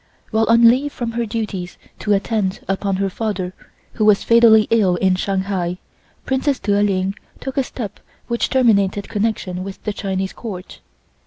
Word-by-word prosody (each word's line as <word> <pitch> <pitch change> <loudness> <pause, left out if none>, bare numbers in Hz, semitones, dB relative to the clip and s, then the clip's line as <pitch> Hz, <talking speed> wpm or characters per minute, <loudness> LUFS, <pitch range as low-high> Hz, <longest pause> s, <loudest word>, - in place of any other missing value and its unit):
While 220 0 +2
on 230 0 +7
leave 265 +5 +3
from 240 -3 -4
her 235 0 -2
duties 205 -5 -4 0.2
to 210 - +1
attend 200 -1 -1
upon 195 0 -1
her 195 +1 0
father, 190 -2 -3 0.4
who 215 - -1
was 210 -2 +5
fatally 230 -2 +6
ill 205 -6 +3
in 185 +1 +2
Shanghai, 190 -2 -1 0.5
Princess 265 +1 0
Der 205 0 +1
Ling 195 -1 +1 0.3
took 265 -1 -5
a 275 - +3
step 215 -5 -7 0.3
which 235 -1 -1
terminated 205 -6 +2
connexion 205 -4 -2
with 195 0 -8
the 210 - -2
Chinese 190 -1 -3
Court. 190 -6 -8
205 Hz, 160 wpm, -20 LUFS, 190-230 Hz, 0.5 s, on